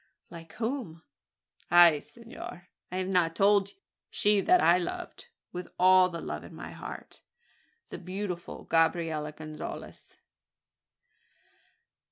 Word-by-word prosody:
"Like 165 -1 -11
whom?" 225 - -4 0.7
"Ah! 175 -3 +7
senor, 230 - -11 0.2
I 185 - -3
have 185 0 -1
not 175 -3 +1
told 200 0 +4
you? - - -19 0.3
She 205 -1 +3
that 360 - +5
I 175 - +5
loved 175 - -6 0.2
with 180 0 -6
all 185 0 +6
the 170 -2 -6
love - - -5
in - - -12
my - - -8
heart - - -9 0.7
the - - -7
beautiful 185 -1 -5
Gabriella 165 -2 +1
Gonzales." 155 0 -9
180 Hz, 120 wpm, -29 LUFS, 165-200 Hz, 0.7 s, Ah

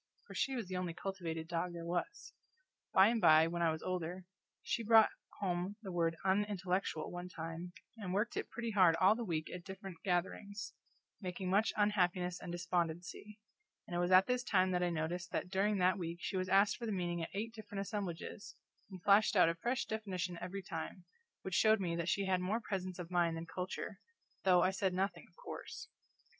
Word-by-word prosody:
for - - -11
she 270 - 0
was 230 -6 -3
the 185 - -4
only 180 -2 -2
cultivated 170 -5 -4
dog 175 +1 -2
there 170 -1 -6
was. 175 - -3 0.6
By 190 +2 +7
and 230 -1 +1
by, 155 0 +7
when 170 +1 -2
I 170 - +4
was 160 0 -3
older, 180 0 -3 0.4
she - - -1
brought 225 0 +6 0.3
home 185 0 -1
the 190 - -5
word 165 -2 +1
Unintellectual, 190 -4 0
one 175 0 -6
time, 165 +1 -6 0.3
and 200 -5 -5
worked 210 +5 0
it - - -3
pretty 235 -1 -3
hard 185 -5 +6
all 185 +4 +5
the 235 +2 -3
week 160 -6 -2
at 180 -1 -6
different 190 -1 -8
gatherings, 200 +2 -2 0.5
making 185 0 -3
much 205 +3 +3
unhappiness 180 -4 +2
and 175 - -6
despondency; 175 +4 -3 0.5
and 175 - -6
it - - +1
was 175 0 +1
at 185 +1 +7
this 250 0 0
time 185 -5 +3
that 180 -1 +1
I 180 - +2
noticed 170 +2 -3
that 180 - -2
during 200 +2 +2
that 185 +1 +3
week 170 -1 -4
she 190 - -3
was 185 0 -1
asked 195 +2 +4
for 235 - -5
the - - -1
meaning 175 -3 -1
at 165 - -3
eight 225 +3 -3
different 210 -3 -6
assemblages, 200 +1 -5 0.3
and 185 -3 -10
flashed 205 +2 +5
out 180 -3 +6
a - - +1
fresh 240 +10 -1
definition 185 -5 -3
every 190 +2 -5
time, 175 +1 -6 0.4
which 190 - -5
showed 220 +2 +5
me 170 -3 -1
that 170 +1 -1
she 200 - +1
had 185 -1 +1
more 200 +5 0
presence 185 -5 -4
of 180 -1 -7
mind 170 -2 +2
than 165 - -5
culture, 185 +3 -5 0.5
though 180 -2 +6
I 185 - +3
said 190 -1 0
nothing, 195 +2 -1
of - - -31
course. - - -8
185 Hz, 200 wpm, -35 LUFS, 175-200 Hz, 0.6 s, By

